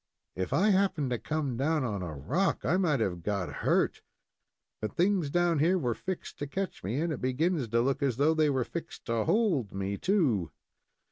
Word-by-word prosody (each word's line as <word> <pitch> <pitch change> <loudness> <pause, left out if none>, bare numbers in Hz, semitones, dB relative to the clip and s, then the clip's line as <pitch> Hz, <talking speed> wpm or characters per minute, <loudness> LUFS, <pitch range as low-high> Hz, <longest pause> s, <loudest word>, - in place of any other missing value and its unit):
"If 95 0 -3
I 210 +4 +4
happened 185 -9 +1
to 120 - -1
come 150 -6 -2
down 150 +2 +1
on 105 -6 -2
a 85 -4 -5
rock, 165 - 0
I 175 - +3
might 160 -8 +2
have 90 -5 -1
got 100 0 -2
hurt; - - +1 0.8
but 110 - -4
things 180 -4 +2
down 175 0 +2
here 175 +5 +3
were 125 -9 0
fixed 185 +11 -6
to 145 - -3
catch 190 +7 -4
me, 110 +9 -2
and 165 0 0
it 135 - -6
begins 140 +2 0
to 115 +2 +2
look 135 +2 0
as 135 -5 +1
though 150 +4 +4
they 155 -1 +3
were 130 -3 +1
fixed 170 +5 -7
to 115 -2 0
hold 170 - +1
me, 95 +1 -3
too." 140 - +2
140 Hz, 200 wpm, -29 LUFS, 115-170 Hz, 0.8 s, I